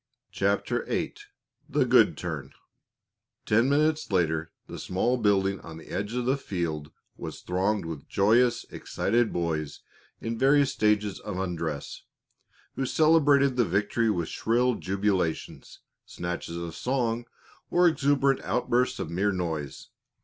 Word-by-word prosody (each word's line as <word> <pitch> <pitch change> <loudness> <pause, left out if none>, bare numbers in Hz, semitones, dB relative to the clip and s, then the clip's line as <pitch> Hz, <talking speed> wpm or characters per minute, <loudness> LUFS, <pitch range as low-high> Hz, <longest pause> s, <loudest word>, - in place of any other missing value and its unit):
CHAPTER - - 0
VIII - - -2 0.6
THE - - +2
GOOD - - +5
TURN - - -5 0.9
Ten 115 +4 +3
minutes 155 -1 +1
later 80 -3 +1
the - - -8
small 120 +7 0
building 100 -3 +2
on 80 0 -10
the 80 - -13
edge 105 +4 -3
of 125 -1 -1
the 130 +2 +2
field 85 - -3 0.3
was - - -7
thronged 95 +2 0
with 80 -4 -7
joyous, 115 +4 +3
excited 115 +2 0
boys 80 -4 -2 0.4
in 115 0 -4
various 140 +1 +4
stages 105 -2 +1
of 105 -3 -6
undress, 85 -6 -4 0.7
who 135 - -2
celebrated 145 -4 +4
the 120 - +5
victory 105 +5 +1
with 85 -6 0
shrill 125 +2 +1
jubilations, 95 -5 -2 0.3
snatches 85 -1 -5
of 85 -1 -5
song, 120 -2 -1 0.4
or 175 0 +4
exuberant 140 -3 +2
outbursts 125 +2 0
of 80 - -5
mere 100 +4 +1
noise. 80 -7 -4
105 Hz, 130 wpm, -27 LUFS, 85-125 Hz, 0.9 s, GOOD